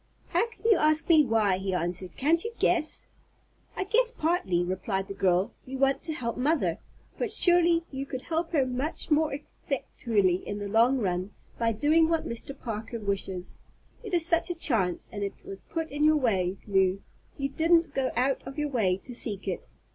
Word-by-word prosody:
"How 465 - +2
can 450 - -19
you 445 -4 +5
ask 310 +1 +3
me 315 -3 +7
why?" 215 -6 +2
he 190 -1 -2
answered. 180 +1 -2
"Can't 325 +5 +2
you 460 - -4
guess?" 335 -3 0 0.7
"I - - -1
guess 465 +5 +2
partly," 315 - 0
replied 190 +2 -2
the 200 - -5
girl; 185 -1 +1 0.2
"you 265 +1 -5
want 270 0 +2
to 320 - 0
help 235 -5 -3
mother. 295 +5 +1 0.4
But 470 -4 -1
surely 345 -5 +4
you 270 0 -5
could 260 -1 -5
help 330 0 -2
her 280 -5 +3
much 260 +6 -3
more 305 +1 +3 0.4
effectually 210 -8 0
in 205 +2 -6
the 205 0 -4
long 230 +6 +4
run 185 -3 -2 0.3
by 230 -1 +1
doing 310 +7 +3
what 330 -1 0
Mr. 265 +4 -6
Parker 225 0 -5
wishes. 195 -3 -3 0.4
It 415 -6 -3
is 335 -2 +2
such 335 0 +2
a 350 - -2
chance, 215 - +1
and 205 - -6
it 200 -1 -5
was 195 0 -8
put 325 -1 -5
in 290 +1 -1
your 310 0 +5
way, 195 -8 0
Lew; 190 -1 +1 0.3
you 275 0 -2
didn't 330 +1 +2
go 265 -1 0
out 260 +3 +1
of 270 +2 -9
your 295 -1 -1
way 205 -9 +1
to 245 +6 -10
seek 205 -4 -2
it. 185 - -4
260 Hz, 195 wpm, -28 LUFS, 195-320 Hz, 0.7 s, me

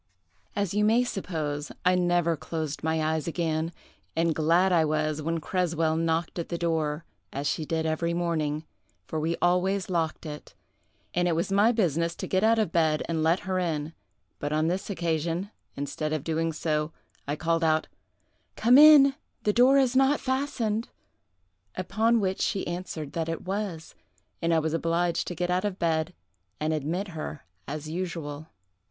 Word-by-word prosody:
"As 200 -4 -1
you 210 +1 +2
may 225 +4 +4
suppose, 155 -10 -3
I 180 - +5
never 175 -2 +2
closed 155 -2 -4
my 160 0 +1
eyes 155 0 -1
again; 165 -1 -1 0.4
and 165 0 +2
glad 170 +5 +3
I 170 -2 +4
was 155 0 0
when 165 +2 -1
Creswell 165 -2 0
knocked 165 +1 -1
at 170 - -4
the 170 - -2
door, 160 -2 -1 0.3
as 140 +1 -4
she 155 +1 -1
did 160 +1 -1
every 160 +1 0
morning, 160 -3 -1 0.4
for 160 - -3
we 165 +2 0
always 185 +2 +2
locked 165 -2 -1
it, 150 -1 -8 0.6
and 175 0 +2
it 170 - +1
was 170 +4 -1
my 205 +4 +5
business 170 - +1
to - - -5
get 190 +1 +1
out 225 +1 +4
of 215 -7 +1
bed 160 -2 +2
and 165 -1 -1
let 165 +4 +2
her 185 0 -1
in; 160 -3 -2 0.5
but 145 - -3
on 155 +1 +1
this 185 +4 -2
occasion, 170 +1 -1 0.2
instead 145 +2 -3
of 155 -3 -2
doing 165 0 0
so, 155 0 -1 0.4
I 145 - -1
called 165 +1 0
out, 155 -1 +2 0.7
'Come 245 +5 +6
in; 295 -2 +9 0.3
the 210 - +2
door 255 +4 +6
is 260 -2 +3
not 270 +2 +4
fastened;' 255 -5 -1 0.9
upon 220 +5 +2
which 190 -2 -1
she 195 - 0
answered 175 -4 -5
that 165 -1 -2
it 165 - -4
was, 190 -4 -4 0.5
and 165 - +1
I 165 - +4
was 160 0 0
obliged 170 +1 0
to 175 - -4
get 175 +1 -1
out 180 +1 +1
of 205 -3 -2
bed 165 0 0 0.4
and 155 +1 0
admit 165 +7 -2
her 155 -3 -6 0.2
as 150 +1 -5
usual. 160 -3 -4
165 Hz, 170 wpm, -27 LUFS, 155-185 Hz, 0.9 s, in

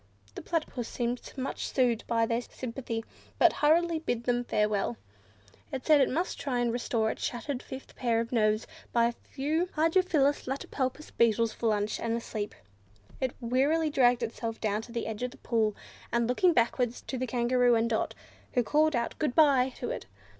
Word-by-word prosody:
The - - -7
Platypus 310 -8 -3
seemed 240 0 -3
much 265 +1 -3
soothed 245 -4 +1
by 230 -1 +2
their 230 +1 0
sympathy, 230 -2 -5 0.3
but - - +5
hurriedly 330 +2 +3
bade 240 -7 -2
them 245 0 +1
farewell. 210 - 0 0.7
It 265 -2 -4
said 305 -2 +6
it - - +3
must 340 +7 -2
try 265 -3 -1
and 240 -1 +1
restore 230 -2 0
its - - -7
shattered 255 +2 -3
fifth 265 0 -9
pair 235 -2 +1
of 230 0 -3
nerves 215 -2 +2 0.3
by 235 -1 +4
a 235 - +2
few 300 +8 -2
hydrophilus 315 -4 +2
latipalpus 270 +2 -3
beetles 230 -1 +2
for 230 - -2
lunch, 210 -1 0
and 230 0 -1
a - - -2
sleep. 210 -2 -5 0.6
It 260 -2 -1
wearily 285 +7 +2
dragged 245 -3 +4
itself 225 0 -4
down 215 -1 0
to 235 - -12
the 235 -1 -3
edge 220 0 -5
of 250 - -1
the - - -15
pool, 220 -3 0 0.4
and 235 0 +2
looked 345 +9 +4
backwards 240 0 +1
to 260 - -5
the 255 - -1
Kangaroo 245 0 +3
and 225 0 +2
Dot, 225 -1 -1 0.4
who 245 - +3
called 305 +5 +3
out 235 0 -2
"Good 300 -5 0
bye" 275 -5 +5
to 245 - -3
it. - - -5
245 Hz, 185 wpm, -29 LUFS, 230-275 Hz, 0.7 s, said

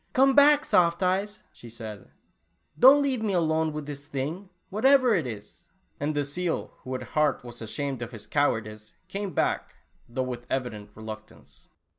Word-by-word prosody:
" - - -41
Come 270 +1 +5
back, 290 +1 +6
Soft 170 +1 +3
Eyes," 195 +3 0
she 120 - -13
said, 110 -3 -9 0.3
" - - -33
don't 275 +3 +8
leaye 265 -4 0
me 205 -4 0
all 175 - +3
alone 160 0 +1
with 150 -1 -5
this 145 0 -7
thing, 155 +7 -4 0.2
whateyer 255 +2 +4
it 160 -8 0
is," 105 -3 -9 0.3
and 145 +1 -1
the 145 -1 0
seal, 170 +4 -3
who, 130 0 -5
at 130 - -4
heart, 150 -4 +2
was 120 -1 -10
ashamed 135 +3 -3
of 120 0 -5
his 115 -4 -10
cowardice, 110 -7 -1
came 195 +1 -4
back, - - -1 0.3
though 130 +2 -2
with 125 -1 -6
eyident 115 -6 -3
re 110 - -11
luctance. 110 0 -11
145 Hz, 185 wpm, -27 LUFS, 120-195 Hz, 0.3 s, don't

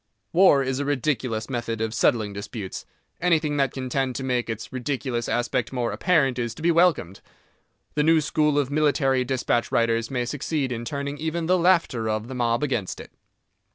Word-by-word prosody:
War 170 -6 +6
is 130 0 -2
a 145 - -1
ridiculous 125 -5 -1
method 120 -3 -3
of 110 0 -2
settling 110 -3 +1
disputes. 100 -1 -7 0.3
Anything 160 -4 +2
that 135 -1 +2
can 130 -1 -5
tend 130 0 -1
to 135 - -4
make 125 -2 -1
its 110 +3 -5
ridiculous 130 -2 -2
aspect 120 -1 -1
more 125 -3 -1
apparent 135 -9 +2
is 120 -1 -3
to 160 - -10
be 170 - +4
welcomed. 160 - +2 0.7
The 150 - +1
new 160 +1 +4
school 150 -1 +1
of 145 -2 0
military 140 -3 +2
dispatch 125 -2 -1
writers 115 0 +1
may 125 -2 -1
succeed 145 0 -2
in 120 -1 -4
turning 140 +2 -4
even 160 +1 -2
the 180 +3 +3
laughter 165 -11 +2
of 110 +2 -2
the - - -5
mob 120 +1 0
against 120 -10 -2
it. - - -11
130 Hz, 185 wpm, -24 LUFS, 120-150 Hz, 0.7 s, War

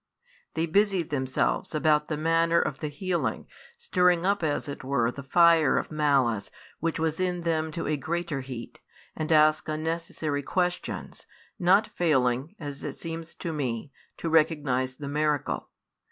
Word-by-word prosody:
They 165 - +1
busy 195 +1 +2
themselves 135 0 -1
about 150 -1 +3
the 155 - -2
manner 165 +2 +3
of 135 - -2
the 155 - -3
healing, 175 +4 -2 0.3
stirring 180 - +2
up 200 0 +2
as 150 -3 -1
it 140 - -6
were 125 -3 +1
the 140 - -8
fire 165 +1 +5
of - - -2
malice 135 -9 +1 0.3
which 165 0 -1
was 160 0 -1
in 180 -1 0
them 160 -2 0
to 165 - -3
a 150 0 0
greater 165 -1 -2
heat, 130 -3 -8 0.4
and 155 0 -3
ask 155 0 +4
unnecessary 155 -2 -2
questions, 180 +4 -3 0.3
not 190 +5 +5
failing, 135 -2 0
as 145 -3 -6
it - - -5
seems 165 0 -6
to 165 - -4
me, 135 -2 -3 0.3
to - - -4
recognize 150 -5 +2
the 140 +1 -7
miracle. 150 0 -1
155 Hz, 155 wpm, -27 LUFS, 140-170 Hz, 0.4 s, fire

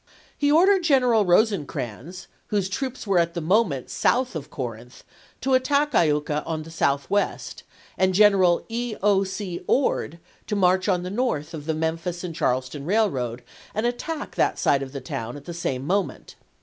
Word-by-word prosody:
He 290 0 +1
ordered 375 +5 +5
General 250 -8 +4
Eosecrans, 175 - 0 0.2
whose 200 -3 -1
troops 260 +5 -4
were 195 -4 +3
at 170 0 0
the - - -1
moment 170 - +1
south 255 -4 +1
of 145 -3 -5
Corinth, 120 -1 -7 0.4
to 270 - 0
attack 280 +3 +2
Iuka 150 -2 +2
on 160 -1 -4
the 165 - -11
southwest, 140 +5 -1 0.4
and 185 0 +2
General 190 -4 +4
E. 235 0 -3
0. 200 -1 +3
C. 190 -2 -5
Ord 250 - +1 0.3
to 210 - -1
march 185 0 +2
on 180 -2 +1
the 180 - -5
north 195 - -1
of 150 -1 -7
the 160 - 0
Memphis 165 +2 -2
and 175 -2 -4
Charleston 130 -1 -1
railroad 140 - 0 0.3
and 215 +2 0
attack 295 +6 -3
that - - +1
side 140 - +2
of 135 -1 -6
the 140 -1 -6
town 120 0 -5
at 145 - -13
the 170 - -6
same 135 -6 -3
moment. 195 +5 -2
180 Hz, 170 wpm, -24 LUFS, 150-220 Hz, 0.4 s, ordered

